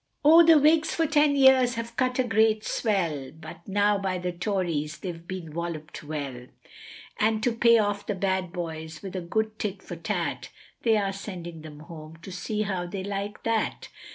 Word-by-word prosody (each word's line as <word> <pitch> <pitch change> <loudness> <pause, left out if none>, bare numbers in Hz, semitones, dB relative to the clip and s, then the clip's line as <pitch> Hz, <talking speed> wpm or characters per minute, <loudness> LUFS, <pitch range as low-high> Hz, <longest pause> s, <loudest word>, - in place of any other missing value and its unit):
O 325 +3 +9
the 330 -1 +7
Whigs 310 +2 +3
for 330 - +2
ten 295 -1 +3
years 265 -2 +5
have 230 0 -5
cut 255 0 0
a 255 - +3
great 220 -2 +2
swell, 170 - -1
But 160 +1 -11
now 205 +1 +2
by 190 -2 -1
the 180 0 -3
Tories 175 -5 -2
they've 170 -2 -7
been 180 -5 -6
wollop'd 160 -2 -5
well, 140 -5 -6 0.7
And 220 0 +2
to 245 - +3
pay 235 0 +5
off 205 -1 -1
the 205 - -1
bad 190 -2 -1
boys 160 -2 -6
with 195 -1 -7
a 185 - -2
good 215 +5 -2
tit 195 -2 -4
for 175 - -7
tat, 165 - -3 0.3
They 225 -2 +3
are 195 -2 0
sending 175 -5 -7
them 150 -1 -11
home 160 -1 -11
to 190 - -8
see 210 +4 -2
how 185 -4 -3
they 190 +1 -5
like 200 +1 -4
that. 225 -2 -1
195 Hz, 185 wpm, -26 LUFS, 170-220 Hz, 0.7 s, O